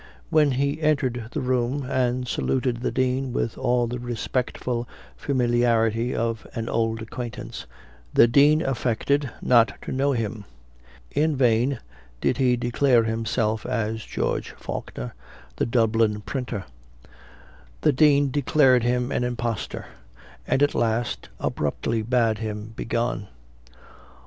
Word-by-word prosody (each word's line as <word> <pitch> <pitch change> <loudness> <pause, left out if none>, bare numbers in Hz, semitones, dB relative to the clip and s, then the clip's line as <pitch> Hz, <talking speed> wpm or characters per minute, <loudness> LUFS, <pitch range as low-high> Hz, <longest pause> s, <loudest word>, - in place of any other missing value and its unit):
When 150 -3 +4
he 140 +4 0
entered 130 -7 +1
the 150 - -3
room, 130 +2 0
and 125 -1 0
saluted 125 -1 0
the 120 - -2
Dean 130 0 0
with 115 - -1
all 125 -1 +1
the 120 +1 -4
respectful 120 0 -2 0.3
familiarity 120 -3 +1
of 115 -1 -2
an 115 -1 -3
old 115 -1 0
acquaintance, 115 0 -7 0.4
the 115 - +6
Dean 145 +6 +5
affected 135 +2 0
not 120 -2 +4
to - - -5
know 140 +2 +1
him; 110 -3 -3 0.7
in 155 +1 +1
vain 125 +1 +2 0.4
did - - +1
he 125 -2 +3
declare 120 0 +3
himself 110 -1 -1
as 110 -3 -2
George - - -2
Faulkner, - - -6 0.4
the - - 0
Dublin 115 -2 +2
printer; 120 -4 -4 1.2
the 150 - +4
Dean 145 0 +4
declared 135 -2 +4
him 125 +2 0
an - - 0
impostor, 120 -3 -3 0.6
and 135 - +2
at 145 - +3
last 115 0 -1
abruptly 115 -1 -1
bade 115 -1 +1
him 110 0 -5
begone. 115 -3 -2
120 Hz, 125 wpm, -24 LUFS, 115-130 Hz, 1.2 s, the